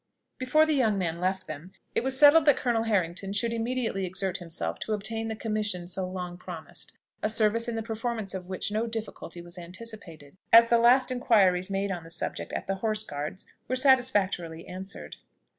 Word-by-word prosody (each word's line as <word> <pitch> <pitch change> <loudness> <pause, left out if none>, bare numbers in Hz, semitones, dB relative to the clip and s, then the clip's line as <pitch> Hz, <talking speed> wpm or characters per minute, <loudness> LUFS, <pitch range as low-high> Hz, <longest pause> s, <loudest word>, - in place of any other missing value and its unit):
Before 265 +5 +4
the 315 - +1
young 225 -7 +2
man 170 -3 -2
left 185 +1 -1
them, 155 +5 -8 0.2
it - - 0
was 265 0 0
settled 295 +2 +7
that 290 - +5
Colonel 230 -2 0
Harrington 195 -2 -1
should 230 +3 0
immediately 230 -3 -1
exert 185 +1 0
himself 85 - -4
to 220 - -2
obtain 225 +2 -2
the 220 - -3
commission 210 -5 -2
so 185 +1 -1
long 180 -1 -6
promised; 170 -5 -9 0.3
a 215 - +1
service 220 +1 +2
in 235 - -2
the 225 - -2
performance 225 -2 -3
of 185 -2 -6
which 190 +2 -3
no 220 +2 0
difficulty 220 -6 -6
was 175 +1 -10
anticipated, 175 -5 -10
as 230 0 +8
the 235 - +5
last 255 +2 +5
inquiries 195 -7 +3
made 195 0 -1
on 175 -3 -4
the 165 - -12
subject 170 +1 -4
at - - -3
the 195 0 -2
Horse 215 +1 0
Guards 150 +3 -6 0.2
were 255 - 0
satisfactorily 205 - +2
answered. 190 +2 -7
205 Hz, 190 wpm, -28 LUFS, 180-230 Hz, 0.3 s, as